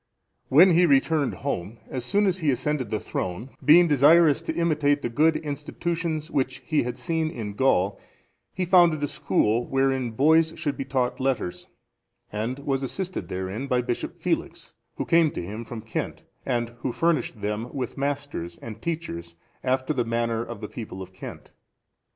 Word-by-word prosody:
When 175 +8 +7
he 175 +1 +5
returned 140 0 +2
home, 110 -5 -3
as 130 -2 -4
soon 205 +11 +2
as 190 -1 +1
he 155 -4 +1
ascended 130 -1 0
the 110 - -1
throne, 95 +9 -4
being 170 +4 +7
desirous 150 +1 +5
to - - -4
imitate 150 -4 +2
the - - -1
good 155 +7 +3
institutions 155 +2 -3
which 130 -2 0
he 155 +1 +2
had 125 0 -4
seen 160 -2 -1
in 110 -8 -5
Gaul, 100 -5 +2 0.5
he 185 - -2
founded 175 -4 +5
a - - +2
school 115 -2 +1
wherein 135 -2 +1
boys 160 +7 +4
should 145 - -2
be 135 - -4
taught 130 -2 -1
letters, 130 -9 -2 0.6
and 110 +5 -2
was 140 -1 -1
assisted 180 - -3
therein 95 +9 -4
by 125 -2 +1
Bishop 120 - -4
Felix, - - -2 0.2
who - - -3
came 165 -2 +4
to - - -3
him 105 +5 -6
from 115 -1 -7
Kent, 115 - -4 0.2
and 120 -3 0
who 130 - -2
furnished 165 -6 0
them 105 +4 -3
with 135 -3 -4
masters 140 -11 -3
and 110 -1 -9
teachers 85 - -4 0.3
after 130 +3 0
the 125 -4 +1
manner 115 0 -1
of 120 -3 -8
the 105 - -4
people 100 -4 -7
of 95 0 -14
Kent. 95 - -10
135 Hz, 170 wpm, -25 LUFS, 115-155 Hz, 0.6 s, When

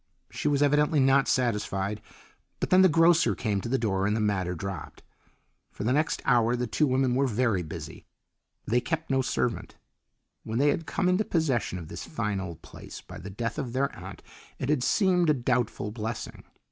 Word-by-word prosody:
She - - -3
was 145 -1 +3
evidently 150 +1 +3
not 135 +1 +4
satisfied, 105 -4 -1 0.6
but - - -3
then 185 +1 +7
the 190 - +6
grocer 165 +1 +4
came 100 -4 -1
to 115 - -5
the 135 - +2
door 95 -4 0
and 105 - +1
the - - 0
matter 95 -4 0
dropped. 95 0 -7 0.7
For - - -7
the 120 +4 +1
next 155 +3 0
hour 120 -2 +3
the 125 0 -1
two 135 +7 +1
women 130 -1 +2
were 135 +2 +2
very 115 -5 +1
busy. 80 - -8 0.6
They 120 +2 +1
kept 160 0 -3
no 135 0 +3
servant. 120 -1 -2 0.7
When 110 +1 -4
they 145 +3 +4
had 165 +2 -1
come 190 - 0
into 185 +4 +3
possession 140 - 0
of 85 -3 -8
this - - -7
fine 105 -9 -2
old 85 -4 -7
place - - -10
by - - -11
the 95 - -8
death 115 +6 -4
of 125 -5 -4
their 135 +2 0
aunt - - -10 0.3
it 135 - -3
had 150 -4 +2
seemed 180 - +2
a 150 - +4
doubtful 120 -4 -1
blessing. 110 +1 -6
125 Hz, 195 wpm, -27 LUFS, 105-145 Hz, 0.7 s, then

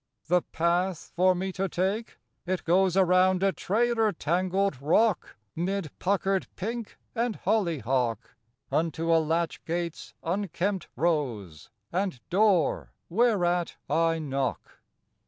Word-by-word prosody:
The 180 +1 +3
path 175 +2 -1
for 185 +1 +4
me 190 +2 -2
to 190 +1 -2
take? 195 +7 -2 0.3
It 185 0 -1
goes 185 +2 +3
Around 185 0 +4
a 195 - +4
trailer 225 +3 +1
tangled 185 -1 0
rock, 205 +8 +2 0.2
'Mid 180 -1 -2
puckered 195 0 0
pink 230 +3 -5 0.2
and 235 -2 -1
hollyhock, 130 - 0 0.4
Unto 165 +1 +1
a 165 - +5
latch 165 +2 -1
gate's 170 0 -4
unkempt 190 +1 -1
rose, 120 - -1 0.2
And 185 -6 -1
door 190 -5 +2 0.2
whereat 180 -4 +2 0.2
I 165 0 +2
knock. 135 -4 -3
180 Hz, 115 wpm, -27 LUFS, 165-195 Hz, 0.4 s, a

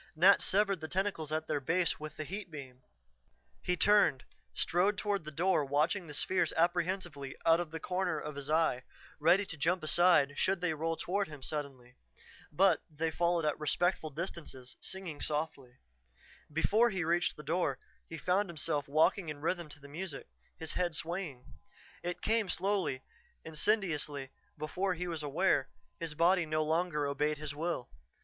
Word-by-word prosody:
Nat 185 +5 +6
severed 195 -1 +2
the 160 - -5
tentacles 185 -4 -1
at 155 0 -1
their 150 -2 -1
base 165 +6 +1
with 155 0 -7
the 155 - -3
heat 195 +5 -6
beam. 135 -5 -9 0.8
He 180 0 0
turned, 205 -11 +4 0.3
strode 190 +4 +2
toward 200 -5 -1
the - - -5
door 170 +1 +2
watching 150 +6 +1
the 150 - -6
spheres 185 +5 +1
apprehensively 175 -4 0
out 165 0 +6
of 175 -2 -3
the 160 +1 -5
corner 180 -1 -1
of 150 0 -5
his 140 0 -6
eye, 155 -5 +2 0.4
ready 175 +6 +4
to 165 - -8
jump 170 +4 +1
aside 155 -3 +4
should 190 0 +2
they 175 -2 0
roll 165 +1 -2
toward 200 +2 -1
him 150 -3 -10
suddenly. 130 -4 -5 0.5
But 185 +2 +4
they 160 +1 -2
followed 170 0 +1
at 150 - 0
respectful 160 +1 +1
distances, 150 -5 -6
singing 180 -6 -6
softly. 150 -5 -3 0.8
Before 210 +10 +3
he 190 -4 -1
reached 175 +1 +1
the 150 - -9
door, 155 -3 0 0.3
he 165 - -6
found 190 +4 +1
himself 150 -3 -1
walking 155 +4 +3
in 150 -1 -5
rhythm 170 +1 -2
to 145 - -9
the 140 - -12
music, 155 +1 -6 0.3
his 160 -1 -4
head 175 -3 0
swaying. 165 -7 -4 0.6
It 175 0 -4
came 220 -3 +2
slowly, 185 -10 0 0.4
insidiously; 155 -6 0 0.3
before 180 +5 -1
he 180 +1 -3
was 165 -3 -3
aware, 145 0 +1 0.3
his 165 -2 -4
body 170 +1 +4
no 155 0 +1
longer 160 -1 0
obeyed 150 +2 0
his 150 -1 -5
will. 155 -4 -3
160 Hz, 165 wpm, -33 LUFS, 150-180 Hz, 0.8 s, Nat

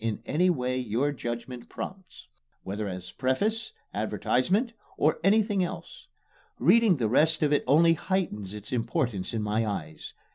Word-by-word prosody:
in 115 -2 -1
any 175 +6 +2
way 130 -5 0
your 125 +4 0
judgment 120 -1 -6
prompts, 190 -1 -8 0.4
whether 100 +2 -4
as 90 -1 -6
preface, 210 - -1 0.2
advertisement, 130 - 0 0.2
or 155 +2 +2
anything 205 0 +3
else. 175 - -7 0.5
Reading 230 -5 +5
the 120 -6 0
rest 155 +7 +3
of 150 0 +3
it 145 - +2
only 165 +5 +6
heightens 155 - -2
its 105 0 -9
importance 115 -4 -1
in 110 -2 -2
my 105 +2 0
eyes. 85 -8 -5
130 Hz, 145 wpm, -27 LUFS, 110-175 Hz, 0.5 s, only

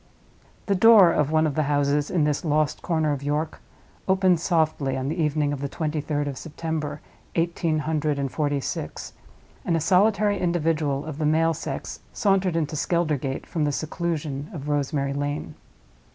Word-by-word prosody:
The 200 - +1
door 195 -2 +7
of 150 -3 +1
one 155 0 +3
of 150 - 0
the 155 - +1
houses 145 0 +1
in 175 -4 +1
this 150 -1 0
lost 155 -2 +1
corner 160 -3 0
of 140 -2 -2
York 150 +2 -2 0.5
opened 190 -2 +3
softly 155 -6 0
on 130 +1 -2
the 165 +2 -2
evening 150 -1 +1
of 140 - -5
the 140 - -2
twenty 155 0 -2
third 145 -1 -2
of 135 -2 -5
September, 155 -2 -4 0.3
eighteen 165 -1 0
hundred 150 -1 -1
and 140 -1 -2
forty 145 -2 0
six; - - -5 0.5
and 170 - +1
a - - 0
solitary 205 +4 +3
individual 155 -5 0
of 155 -1 -6
the 155 - 0
male 165 +2 +3
sex 155 - -5
sauntered 195 -4 +2
into 155 -2 -1
Skeldergate 150 -5 -1
from 160 - -2
the 145 - +1
seclusion 155 -2 -3
of 150 -6 -6
Rosemary 140 -1 0
Lane. 145 +1 -3
155 Hz, 170 wpm, -25 LUFS, 145-165 Hz, 0.5 s, door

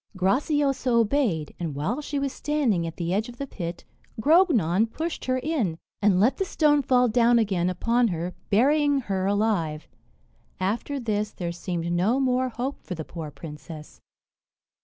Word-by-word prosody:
Graciosa 270 - +1
obeyed; 230 - +1
and 165 -5 -3
while 200 - -2
she 290 0 -4
was 275 -1 -1
standing 255 - 0
at 165 - -7
the 170 0 -2
edge 215 +4 -1
of 240 - -11
the 280 - -4
pit, 175 -9 -6 0.3
Grognon 230 - +4
pushed 325 +5 -4
her 255 0 +1
in, 255 - -1 0.2
and 200 -3 +4
let 230 +7 +3
the 390 - 0
stone 300 -5 +2
fall 250 -2 +3
down 235 +1 +4
again 190 -6 +1
upon 235 +6 +1
her, 175 -1 -3 0.2
burying 285 +6 +3
her 190 -4 -2
alive. 200 -7 0 0.7
After 225 +9 -2
this, 215 -3 -1
there 170 -2 -4
seemed 170 -1 -4
no 200 +9 +2
more 255 -1 +1
hope 250 +4 -4
for 180 - -5
the 160 -2 -6
poor 165 -3 -7
princess. 150 +1 -10
220 Hz, 160 wpm, -25 LUFS, 175-270 Hz, 0.7 s, Grognon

